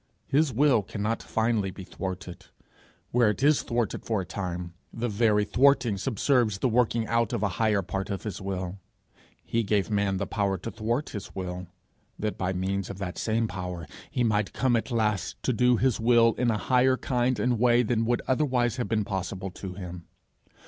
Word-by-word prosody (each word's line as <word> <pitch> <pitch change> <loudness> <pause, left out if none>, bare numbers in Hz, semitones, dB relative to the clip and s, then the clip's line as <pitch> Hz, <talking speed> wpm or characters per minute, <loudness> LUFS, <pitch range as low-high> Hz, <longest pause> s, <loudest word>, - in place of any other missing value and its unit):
His 145 +1 +2
will 130 -1 +4
cannot 105 +3 -3
finally 110 -3 0
be 95 +1 -8
thwarted; 95 0 -6 0.6
where 120 -2 +4
it 105 +6 -2
is 150 0 +5
thwarted 120 -2 -2
for 110 -4 0
a - - -6
time, 90 -2 -5 0.2
the 120 +1 -2
very 105 -1 +2
thwarting 125 -2 +3
subserves 115 +1 +1
the 130 - +1
working 115 -1 +2
out 115 0 +1
of 110 -3 -1
a 100 - +2
higher 105 -3 +3
part 95 +3 -4
of 100 -2 -3
his 105 -1 -5
will. 95 -1 -4 0.7
He 115 - 0
gave 105 -1 0
man 100 -2 +1
the 100 - -1
power 100 -2 0
to 105 +6 -6
thwart 115 +6 -2
his 105 -4 -7
will, 90 -1 -5 0.5
that, 105 0 -2
by 95 0 -1
means 95 +1 -2
of 100 - -6
that 95 -2 -5
same 115 0 +1
power, 90 -3 -5 0.2
he 125 - 0
might 105 -3 +1
come 130 -2 +2
at 115 - -1
last 110 -5 0
to 130 - +1
do 125 +1 +4
his 130 -2 +1
will 115 0 +5
in 125 -1 0
a 110 - +1
higher 130 +3 +3
kind 125 -1 0
and 125 -3 +1
way 120 0 +4
than 115 0 +1
would 120 0 +1
otherwise 130 -3 +1
have 125 - -1
been 110 -2 0
possible 95 0 -4
to 90 0 -7
him. 90 -2 -8
110 Hz, 190 wpm, -27 LUFS, 95-120 Hz, 0.7 s, is